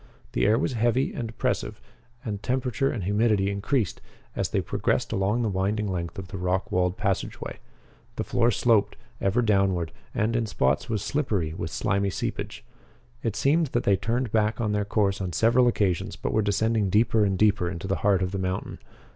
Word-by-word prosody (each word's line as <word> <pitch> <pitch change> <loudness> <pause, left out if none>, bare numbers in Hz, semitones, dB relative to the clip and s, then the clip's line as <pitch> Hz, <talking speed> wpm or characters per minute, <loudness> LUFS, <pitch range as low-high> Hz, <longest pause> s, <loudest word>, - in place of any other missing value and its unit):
The - - +1
air 110 +2 +4
was 135 +1 0
heavy 120 +3 +1
and 115 -2 -4
oppressive 110 - -2 0.5
and 105 -3 -3
the - - -27
temperature 130 +3 0
and 105 - -3
humidity 105 0 +2
increased 100 - -1 0.3
as - - -1
they - - +1
progressed - - -1
along 105 +5 +1
the - - +1
winding 105 +2 0
length 90 0 -3
of 95 -1 -7
the 95 -1 -6
rock 90 +1 -1
walled 90 +2 +1
passageway. 100 -3 -3 0.6
The - - -2
floor 120 0 +2
sloped, 110 -2 +2 0.3
ever 105 +6 +2
downward 95 -6 +2 0.2
and, 110 +2 +1
in 115 -1 0
spots, 90 - 0
was 105 -3 -1
slippery 105 - -1
with 80 -1 -4
slimy 100 +3 0
seepage. - - -4 0.6
It 115 -3 -2
seemed 145 +9 +2
that 120 - +1
they 100 - +4
turned 115 +4 -1
back 110 0 +1
on 110 -3 0
their 105 -1 0
course 100 -2 +1
on 90 -2 -3
several 120 +7 +4
occasions 100 -7 0
but - - -3
were 110 - +3
descending 105 0 +1
deeper 110 +2 +3
and 95 -2 +1
deeper 100 -3 +3
into 85 0 -6
the 95 - 0
heart 100 -2 +2
of 90 - -2
the 100 - -3
mountain. 95 0 -3
105 Hz, 190 wpm, -26 LUFS, 95-115 Hz, 0.6 s, air